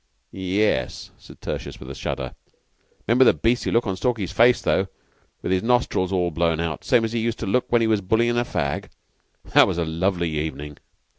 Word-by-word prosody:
"Ye 95 Hz, +2 st, -1 dB
es," 65 Hz, -, -1 dB
said -, -, -15 dB
Tertius, -, -, -5 dB
with -, -, -9 dB
a -, -, -5 dB
shudder. 65 Hz, -2 st, -4 dB, 0.7 s
"'Member 120 Hz, +3 st, +5 dB
the -, -, +5 dB
beastly 120 Hz, +2 st, 0 dB
look 115 Hz, +1 st, +2 dB
on 95 Hz, -3 st, -2 dB
Stalky's 100 Hz, -1 st, -1 dB
face, 120 Hz, +1 st, +5 dB
though, 95 Hz, -, +1 dB, 0.6 s
with -, -, -2 dB
his 95 Hz, -1 st, +2 dB
nostrils 115 Hz, -6 st, +1 dB
all 90 Hz, -2 st, 0 dB
blown 85 Hz, 0 st, 0 dB
out, 80 Hz, -3 st, -3 dB
same 115 Hz, -2 st, +3 dB
as 110 Hz, -, -4 dB
he 120 Hz, -, 0 dB
used 115 Hz, 0 st, -1 dB
to -, -, -4 dB
look 120 Hz, +6 st, 0 dB
when 120 Hz, -1 st, +4 dB
he 115 Hz, -, +2 dB
was 110 Hz, -2 st, +2 dB
bullyin' 115 Hz, +5 st, +1 dB
a 120 Hz, -, +2 dB
fag? 70 Hz, -11 st, -3 dB, 0.6 s
That -, -, +7 dB
was -, -, -2 dB
a 85 Hz, -, 0 dB
lovely 85 Hz, +1 st, -1 dB
evening." 75 Hz, -1 st, -5 dB
95 Hz, 205 wpm, -23 LUFS, 85-115 Hz, 0.7 s, That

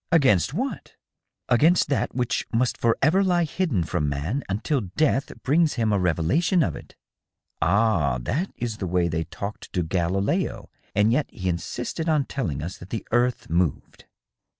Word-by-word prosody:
Against 130 Hz, -, +4 dB
what?" -, -, -4 dB, 0.3 s
" -, -, -60 dB
Against 155 Hz, +9 st, +4 dB
that 140 Hz, -, -1 dB
which 125 Hz, -2 st, -1 dB
must 120 Hz, +1 st, +1 dB
forever 155 Hz, +11 st, +2 dB
lie 175 Hz, -2 st, +2 dB
hidden 160 Hz, -, 0 dB
from 75 Hz, -2 st, -1 dB
man 80 Hz, -, -2 dB
until 120 Hz, +8 st, 0 dB
death 135 Hz, -, 0 dB
brings 155 Hz, +3 st, +3 dB
him 110 Hz, -3 st, +1 dB
a 100 Hz, -, +2 dB
revelation 90 Hz, -, +2 dB
of -, -, -2 dB
it." -, -, -12 dB, 0.4 s
" -, -, -52 dB
Ah, 90 Hz, -, +2 dB
that 150 Hz, -, -2 dB
is 115 Hz, -3 st, -3 dB
the 95 Hz, -, -3 dB
way 90 Hz, 0 st, +1 dB
they 80 Hz, 0 st, -2 dB
talked 100 Hz, +6 st, -7 dB
to 90 Hz, -3 st, +1 dB
Galileo, 90 Hz, +3 st, -1 dB, 0.2 s
and 105 Hz, +2 st, +4 dB
yet 135 Hz, +5 st, +1 dB
he 95 Hz, -, -6 dB
insisted 90 Hz, -, -3 dB
on 150 Hz, -3 st, +2 dB
telling 80 Hz, -, -3 dB
us 85 Hz, +3 st, -6 dB
that 90 Hz, -, -11 dB
the 110 Hz, -, -4 dB
earth 120 Hz, +1 st, +1 dB
moved." 85 Hz, -2 st, -1 dB
110 Hz, 170 wpm, -24 LUFS, 90-140 Hz, 0.4 s, Against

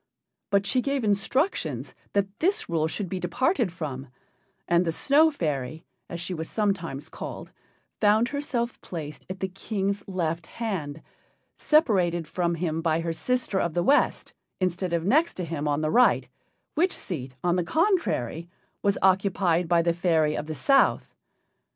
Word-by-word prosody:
But 200 Hz, -1 st, +2 dB
she 250 Hz, +6 st, +2 dB
gave 275 Hz, -1 st, -1 dB
instructions 220 Hz, -, 0 dB, 0.2 s
that 200 Hz, 0 st, -1 dB
this 395 Hz, +6 st, +1 dB
rule 160 Hz, -2 st, +1 dB
should 190 Hz, +4 st, -3 dB
be 185 Hz, +1 st, -3 dB
departed 240 Hz, -, +1 dB
from, 145 Hz, -6 st, -5 dB, 0.6 s
and 170 Hz, +1 st, +4 dB
the 165 Hz, -, 0 dB
Snow 290 Hz, -, +4 dB
fairy, 155 Hz, -, -3 dB, 0.2 s
as 170 Hz, -, -5 dB
she 175 Hz, +2 st, -4 dB
was 160 Hz, -1 st, -5 dB
sometimes 185 Hz, -10 st, -1 dB
called, -, -, -8 dB, 0.5 s
found 215 Hz, +3 st, +4 dB
herself 250 Hz, -5 st, -2 dB
placed 150 Hz, -4 st, -7 dB
at 185 Hz, 0 st, -6 dB
the 190 Hz, -, 0 dB
King's 200 Hz, +1 st, -3 dB
left 170 Hz, -3 st, -2 dB
hand, 160 Hz, -10 st, -4 dB, 0.5 s
separated 185 Hz, -, +2 dB
from 170 Hz, +1 st, -1 dB
him 165 Hz, -1 st, -2 dB
by 165 Hz, -1 st, +1 dB
her 165 Hz, 0 st, -2 dB
sister 245 Hz, +1 st, -1 dB
of 170 Hz, -3 st, -1 dB
the 175 Hz, -, +2 dB
West, 280 Hz, -, +2 dB, 0.3 s
instead 185 Hz, -1 st, -1 dB
of 170 Hz, -1 st, 0 dB
next 310 Hz, -, +3 dB
to 180 Hz, -, -3 dB
him 150 Hz, -2 st, -3 dB
on 145 Hz, +1 st, +1 dB
the 155 Hz, 0 st, 0 dB
right, 250 Hz, +1 st, +4 dB, 0.5 s
which 355 Hz, +4 st, +2 dB
seat, 130 Hz, -7 st, -5 dB
on 175 Hz, 0 st, +2 dB
the 180 Hz, -, +1 dB
contrary, 175 Hz, -, 0 dB, 0.3 s
was 200 Hz, 0 st, +2 dB
occupied 185 Hz, -3 st, +2 dB
by 170 Hz, 0 st, +3 dB
the 170 Hz, 0 st, +2 dB
fairy 160 Hz, -3 st, +2 dB
of 150 Hz, -, -4 dB
the 155 Hz, -, -4 dB
South. 275 Hz, -, +3 dB
180 Hz, 160 wpm, -26 LUFS, 165-215 Hz, 0.6 s, and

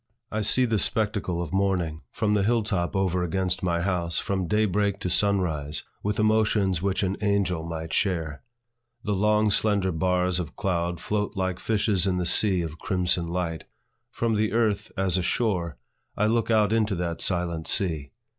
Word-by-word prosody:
I 110 Hz, -, -1 dB
see 125 Hz, +5 st, +3 dB
the 115 Hz, -3 st, +1 dB
spectacle 105 Hz, -6 st, 0 dB
of 80 Hz, -, -7 dB
morning 90 Hz, -5 st, 0 dB
from 105 Hz, -1 st, 0 dB
the 105 Hz, -, +2 dB
hill 115 Hz, +3 st, +2 dB
top 95 Hz, -3 st, -2 dB
over 95 Hz, -2 st, +1 dB
against 90 Hz, +1 st, 0 dB
my 85 Hz, -2 st, 0 dB
house, 85 Hz, -2 st, -1 dB
from 95 Hz, -3 st, -1 dB
day 105 Hz, +4 st, +2 dB
break 100 Hz, 0 st, 0 dB
to 90 Hz, -, -2 dB
sun 100 Hz, +1 st, +2 dB
rise, 75 Hz, -4 st, -3 dB, 0.2 s
with 105 Hz, 0 st, -2 dB
emotions 110 Hz, -4 st, +2 dB
which 100 Hz, +1 st, 0 dB
an 95 Hz, +1 st, -1 dB
angel 100 Hz, -5 st, +1 dB
might 80 Hz, -1 st, -5 dB
share. 80 Hz, -6 st, -1 dB, 0.6 s
The 105 Hz, -, -1 dB
long 105 Hz, +2 st, +2 dB
slender 100 Hz, -2 st, +2 dB
bars 90 Hz, +2 st, +1 dB
of 85 Hz, -4 st, -5 dB
cloud 85 Hz, -2 st, -1 dB
float 105 Hz, 0 st, -2 dB
like 95 Hz, -1 st, -1 dB
fishes 105 Hz, -4 st, +1 dB
in 90 Hz, -1 st, +1 dB
the 90 Hz, -, -1 dB
sea 95 Hz, 0 st, +3 dB
of 80 Hz, 0 st, -7 dB
crimson 90 Hz, -2 st, 0 dB
light. 85 Hz, -2 st, -3 dB, 0.4 s
From 115 Hz, -1 st, -1 dB
the 105 Hz, 0 st, 0 dB
earth, 110 Hz, -3 st, 0 dB
as 95 Hz, -1 st, +1 dB
a -, -, 0 dB
shore, 90 Hz, -, -1 dB, 0.4 s
I 105 Hz, -, +2 dB
look 115 Hz, +1 st, +1 dB
out 110 Hz, -1 st, +3 dB
into 110 Hz, -3 st, +1 dB
that 85 Hz, -1 st, -3 dB
silent 85 Hz, -3 st, 0 dB
sea. 80 Hz, -7 st, 0 dB
95 Hz, 180 wpm, -26 LUFS, 85-105 Hz, 0.6 s, see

